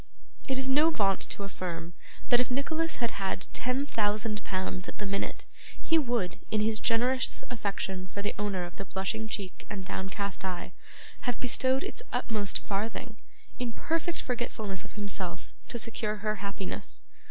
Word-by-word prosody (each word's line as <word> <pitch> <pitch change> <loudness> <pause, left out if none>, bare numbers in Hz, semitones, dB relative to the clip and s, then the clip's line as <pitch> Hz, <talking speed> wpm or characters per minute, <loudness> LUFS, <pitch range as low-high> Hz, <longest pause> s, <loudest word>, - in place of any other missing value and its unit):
It 265 - +2
is 265 0 +2
no 295 +4 +6
vaunt 195 - +3
to 200 - 0
affirm 175 -3 -4 0.4
that 245 - +7
if 250 - +2
Nicholas 315 +5 +1
had 235 -2 +1
had 195 -1 -1
ten 255 +3 +2
thousand 210 -3 +1
pounds 185 0 -1
at - - -7
the 205 - -2
minute, 200 0 -1 0.3
he 325 0 +4
would, 240 -10 +1
in 215 - +3
his 215 0 +3
generous 250 +3 +3
affection 195 -4 -1
for 200 +1 -4
the 205 - +1
owner 200 -3 +1
of 175 0 -7
the 195 - -4
blushing 205 +4 -1
cheek 200 -4 -3
and 195 -2 -4
downcast 190 0 -2
eye, 185 -2 -2 0.6
have 245 - -1
bestowed 260 +1 +3
its - - -4
utmost 210 -3 0
farthing, 220 +3 -2 0.4
in 245 -2 -1
perfect 330 +4 0
forgetfulness 220 -5 -1
of - - -11
himself, 200 -4 -3 0.2
to - - -3
secure 220 -2 0
her 215 0 0
happiness. 200 -1 -2
210 Hz, 165 wpm, -31 LUFS, 195-245 Hz, 0.6 s, that